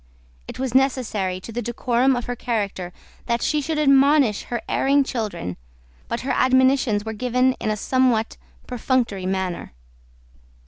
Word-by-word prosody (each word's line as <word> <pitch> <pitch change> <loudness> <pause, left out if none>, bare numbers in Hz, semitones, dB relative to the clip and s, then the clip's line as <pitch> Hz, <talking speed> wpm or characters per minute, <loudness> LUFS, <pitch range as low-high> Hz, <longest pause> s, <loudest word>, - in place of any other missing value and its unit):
It - - -8
was 260 -2 -3
necessary 230 -8 +1
to 230 - -9
the 240 +2 -3
decorum 240 +2 +1
of 245 - -3
her 245 - -3
character 200 -7 -3 0.4
that 235 -1 0
she 300 -1 +1
should 310 +2 -2
admonish 275 -5 +4
her 240 - -4
erring 280 +1 +2
children: 215 - -4 0.5
but 235 - -3
her 265 - -2
admonitions 260 -4 +3
were 220 - -4
given 250 +3 +1
in - - -2
a 215 - -1
somewhat 245 -1 +1 0.3
perfunctory 235 -6 -1
manner. 190 - -3
245 Hz, 145 wpm, -22 LUFS, 215-260 Hz, 0.5 s, admonish